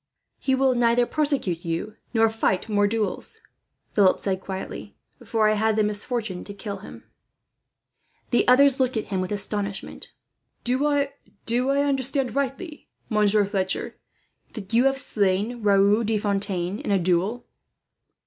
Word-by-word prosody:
"He 265 - +1
will 265 0 +3
neither 240 0 +3
persecute 275 - -1
you, 170 +6 -3 0.2
nor 225 -2 +4
fight 220 -3 0
more 205 -1 +2
duels," 210 -2 -2 0.5
Philip 195 -3 +4
said 190 -1 -2
quietly; 190 - -7 0.3
"for 220 -2 +1
I 215 - +3
had 220 +1 +1
the 215 - +2
misfortune 210 -2 -2
to 200 - -8
kill 200 0 -6
him." 195 - -12 1.3
The 240 - +2
others 270 +2 +5
looked 255 -2 +1
at 215 - -4
him 190 -2 -1
with 185 - -4
astonishment. 205 -1 -3 0.5
"Do 260 +4 +1
I 285 -1 +2 0.8
understand 270 -1 0
rightly, 280 +4 -3 0.2
Monsieur 210 -2 +3
Fletcher, 195 -2 -2 0.5
that 200 -2 -8
you 240 +3 +4
have 270 0 +3
slain 210 0 0
Raoul 205 +2 +4
de 220 0 0
Fontaine 200 -2 -1
in - - -5
a 200 - +3
duel?" 185 +6 0
215 Hz, 140 wpm, -24 LUFS, 195-245 Hz, 1.3 s, others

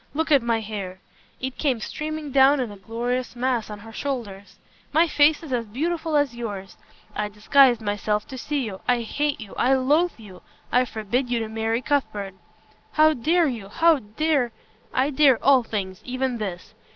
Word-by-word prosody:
Look 320 +1 -1
at 280 -3 +6
my 230 -1 0
hair." 200 -4 -6 0.4
It 260 0 -5
came 265 -6 +1
streaming 305 +5 -5
down 275 +1 +5
in 245 -4 -2
a - - -9
glorious 240 +5 -3
mass 245 -3 -1
on 210 - -6
her 225 +1 -11
shoulders. 215 -8 -5 0.3
"My 330 +2 +4
face 300 +1 +3
is 290 -5 -5
as 235 -2 -1
beautiful 320 +7 -2
as 290 -4 +2
yours. 205 -5 -6 0.4
I 210 0 -2
disguised 240 +3 +4
myself 210 0 -1
to 260 - -7
see 290 +3 -2
you. 205 -6 -5
I 245 -1 +3
hate 290 +5 -1
you! 215 -4 -9
I 260 +2 +3
loathe 295 +7 +2
you! 205 -5 -13 0.3
I 250 +1 +4
forbid 240 +3 -2
you 245 - +1
to 220 - -3
marry 225 +2 -1
Cuthbert." 210 -9 -1 0.6
"How 310 0 +5
dare 325 +6 +2
you 230 -9 -4
how 325 +6 +4
dare 250 +3 0 0.2
" 215 - -34
"I 270 +3 +1
dare 270 -3 +5
all 270 -2 +6
things 195 -5 -5
even 255 -1 -2
this." 190 -2 -6
245 Hz, 185 wpm, -24 LUFS, 215-285 Hz, 0.6 s, at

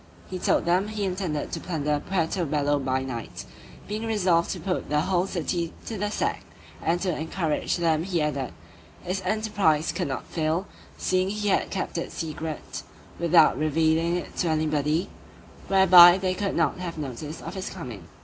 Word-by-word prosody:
He 185 - -3
told - - +2
them 180 +4 +2
he 215 -1 -3
intended 180 -6 -2
to - - -3
plunder 150 -4 -1
Puerto 180 0 0
Bello 145 -1 +1
by 130 -1 -1
night, 120 -3 -6 0.4
being 215 +2 -3
resolved 180 -6 +2
to - - -3
put 185 -2 -3
the 150 0 +2
whole 185 +1 +1
city 170 -2 -2
to 225 - -4
the 205 0 -1
sack: - - -1 0.4
and 170 +2 +1
to 180 -4 0
encourage 160 0 -1
them 165 -2 +2
he 175 0 -1
added, 140 -4 -1 0.5
this 185 +2 -2
enterprise 195 -6 +1
could - - -2
not 135 - -4
fail, 160 +3 -1 0.3
seeing 185 0 +1
he 210 0 -1
had - - +2
kept 185 -3 -3
it - - -5
secret, 155 -1 -5 0.4
without 170 -5 +5
revealing 160 +2 +2
it 180 - -5
to 175 - +1
anybody, 155 +1 +1 0.6
whereby 185 -2 +9
they 185 -1 0
could 200 +1 -2
not - - +1
have 170 -2 -5
notice 150 +2 -6
of - - -7
his 190 -1 -4
coming. 120 - -8
170 Hz, 170 wpm, -26 LUFS, 155-190 Hz, 0.6 s, whereby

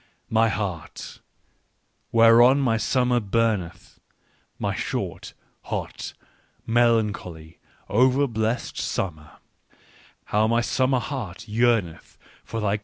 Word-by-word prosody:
" - - -44
My 115 - +4
heart, 95 -7 -5 0.9
whereon 115 +4 +6
my 125 -5 +2
summer 125 +1 +1
burnetii, 100 -5 -2 0.6
my - - -2
short, - - -4 0.3
hot, - - -5 0.5
melancholy, 105 -9 0 0.3
over 130 +6 +3
blessed 115 -1 -2
summer: 80 -5 -4 0.9
how 105 +1 +1
my 115 +1 +2
summer 130 +2 +1
heart 120 - -5
yearneth 110 -7 0 0.3
for 115 - -5
thy 105 -1 0
coolness - - -14
115 Hz, 105 wpm, -24 LUFS, 100-120 Hz, 0.9 s, whereon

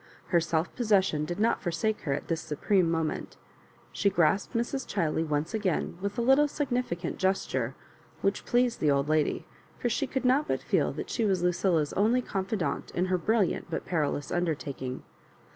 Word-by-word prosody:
Her 175 - +4
self 165 0 -1
pos 240 -3 -2
session 190 -7 +3
did 175 +5 -4
not 230 +2 +2
forsake 195 +5 -1
her 140 - -1
at 140 - -4
this 165 -2 -1
supreme 175 +4 +1
mo 165 -1 +1
ment 155 - -4 0.5
She 200 - +2
grasped 190 +5 +1
Mrs. 240 +3 -1
Chiley 165 -4 0
once 150 +2 -1
again 190 -5 -1
with 200 +3 -3
a 235 - +1
little 270 +4 +5
fflgnificant 245 - -2
gesture 135 -10 0 0.5
which 195 +1 0
pleased 245 0 +1
the 150 - +2
old 140 +1 +2
lady, 155 -1 +1 0.3
for 240 - -1
she 280 +5 0
could 265 -1 -2
not 270 +4 +3
but - - -1
feel - - +1
that - - -6
she 230 - 0
was 190 -4 +1
Lucilla's 175 -4 +1
only 230 +5 +2
confidante 195 -2 -2
in 180 - +2
her - - +4
brilliant 215 0 +1
but 165 - -3
peril 155 -5 0
ous 145 - -6
undertaking. 140 -7 -2
185 Hz, 185 wpm, -28 LUFS, 160-220 Hz, 0.5 s, little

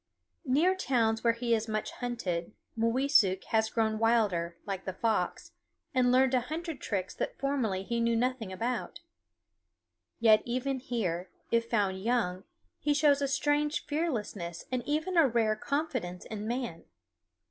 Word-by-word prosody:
Near 310 +9 +4
towns 230 -10 +1
where 230 -1 +4
he 235 0 0
is 225 0 0
much 215 -1 -2
hunted 210 -8 -3 0.2
Mooweesuk 230 -4 +3
has 220 -1 +2
grown 220 -1 0
wilder, 205 -7 +2
like 195 -2 -4
the 190 - -3
fox, 225 -2 -1 0.4
and 250 -1 +3
learned 260 +1 +4
a 255 - +5
hundred 315 +3 -5
tricks 190 -3 -2
that - - -4
formerly 250 -9 -1
he 235 +4 -2
knew 230 0 +2
nothing 240 -3 -1
about. 230 +5 -3 1.2
Yet 220 -2 +6
even 255 +2 -2
here, 190 -9 -2 0.2
if 230 0 +1
found 195 -4 +1
young, 215 -6 0 0.3
he 290 0 +1
shows 290 -1 +4
a 280 - +1
strange 290 +3 +1
fearlessness 220 - -3
and 255 -1 0
even 315 +5 0
a 320 -4 +7
rare 225 -3 +2
confidence 255 - -3
in 215 -1 -5
man. 235 -8 -3
235 Hz, 145 wpm, -30 LUFS, 210-265 Hz, 1.2 s, a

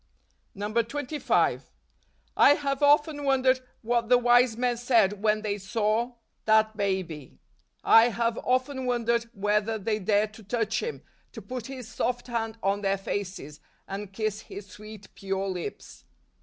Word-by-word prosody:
144 230 +7 -2 0.5
DECEMBER. - - -5
25. - - -31 0.6
I 290 - +6
have 280 -1 -2
often 290 +1 +3
wondered 265 -1 +3 0.2
what 235 0 0
the 250 - +7
wise 245 -1 +4
men 245 0 +1
said 225 -5 +2
when 215 0 +1
they 205 -1 -2
saw 220 +4 -1 0.3
that 220 0 +3
Baby. 185 - -3 0.5
I 225 +1 +7
have 230 0 -1
often 255 +1 -1
wondered 235 -1 0
whether 210 +2 0
they 215 +1 -2
dared 210 +2 +1
to 220 - -13
touch 220 +1 -1
Him, 465 0 -5 0.3
to 225 - -8
put 245 +2 -6
His 260 -4 -8
soft 245 +1 -2
hand 230 -2 -3
on 200 +1 +1
their 195 -1 +1
faces, 185 -7 -5 0.3
and 195 0 -6
kiss 215 0 -3
His 200 0 -9
sweet, 210 +1 -12
pure 195 0 -3
lips. 180 -3 -6
220 Hz, 150 wpm, -27 LUFS, 205-245 Hz, 0.6 s, the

